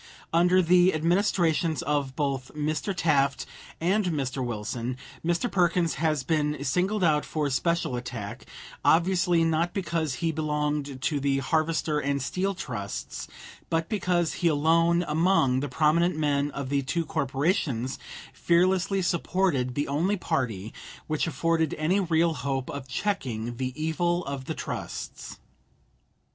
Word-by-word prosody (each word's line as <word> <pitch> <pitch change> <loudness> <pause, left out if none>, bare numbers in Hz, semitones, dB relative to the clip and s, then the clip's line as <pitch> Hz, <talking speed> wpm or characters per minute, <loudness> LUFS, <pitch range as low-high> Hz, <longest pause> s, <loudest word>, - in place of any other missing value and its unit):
Under 180 +2 +4
the 180 +1 +5
administrations 165 -2 +1
of 140 -2 -1
both 135 -3 -2
Mr. 155 +5 -1
Taft 140 -5 +2 0.3
and 195 +5 +2
Mr. 135 -5 -2
Wilson, 120 +2 -3 0.3
Mr. 170 +5 0
Perkins 175 -2 +2
has 155 -4 +1
been 150 0 0
singled 185 +8 0
out 150 -3 +3
for 150 -2 -2
special 170 -1 0
attack, 120 -4 -6 0.4
obviously 175 0 +3
not 165 +2 +1
because 165 -7 -1
he 165 +3 -1
belonged 150 -3 -2
to 145 - +1
the 140 0 +1
Harvester 155 +1 0
and 140 -1 0
Steel 185 +8 -1
Trusts, 105 - -5 0.4
but 165 0 0
because 180 -5 +1
he 175 - +3
alone 165 +3 +3
among 150 -5 +3
the 145 +1 -3
prominent 160 +5 +2
men 145 -2 +1
of 140 -2 -5
the 140 0 +1
two 165 +5 -1
corporations, 135 - -1 0.3
fearlessly 185 +2 +2
supported 170 -7 0
the 145 - -1
only 170 +9 +1
party 110 - -2 0.3
which 155 +1 -1
afforded 165 -1 0
any 170 +6 +1
real 170 -2 +2
hope 135 -1 -3
of 140 -2 -6
checking 125 - -2
the 130 0 -2
evil 170 +3 0
of 135 -1 -5
the - - -4
trusts. - - -6
155 Hz, 135 wpm, -27 LUFS, 140-170 Hz, 0.4 s, the